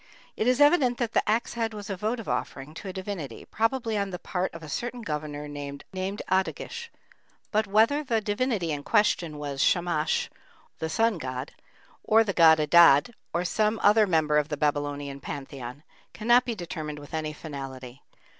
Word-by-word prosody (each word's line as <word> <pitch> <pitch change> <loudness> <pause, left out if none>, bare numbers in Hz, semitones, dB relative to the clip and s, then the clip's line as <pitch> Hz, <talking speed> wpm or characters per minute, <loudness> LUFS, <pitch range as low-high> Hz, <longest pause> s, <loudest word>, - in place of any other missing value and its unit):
It 220 - -1
is 250 +1 +3
evident 290 -5 +5
that 235 -3 -1
the - - +4
axe 225 +2 +1
head 225 -2 -2
was 205 -1 -7
a 195 - -3
votive 220 +4 -3
offering 135 +3 -3
to 180 - -8
a - - -3
divinity, 185 - -6
probably 225 -1 0
on 200 -1 -1
the 180 - -5
part 180 +1 -2
of 165 0 -10
a - - -8
certain 240 +9 -4
governor 150 -3 -4
named 145 -1 -7
Adduggish; 195 - -2 0.6
but 215 0 +1
whether 225 +9 +3
the 235 -5 +1
divinity 205 -4 -1
in 145 -1 -2
question 170 -5 +1
was 140 -2 -4
Shamash 170 -3 +1 0.5
(the 160 - -2
sun 225 +2 +1
god), 130 0 -5 0.5
or 225 +1 +5
the 200 -3 -2
god 160 -2 +7
Adad, 155 - +6 0.2
or 175 +1 -1
some 215 +4 +1
other 210 +1 +5
member 155 -4 +3
of 150 +1 -2
the 150 - -3
Babylonian 145 -1 -1
pantheon, 135 -1 -7 0.3
cannot 240 +3 +4
be 235 - -2
determined 155 -5 -5
with 145 +1 -12
any 155 -1 -2
finality. 135 -4 -8
180 Hz, 175 wpm, -27 LUFS, 150-220 Hz, 0.6 s, god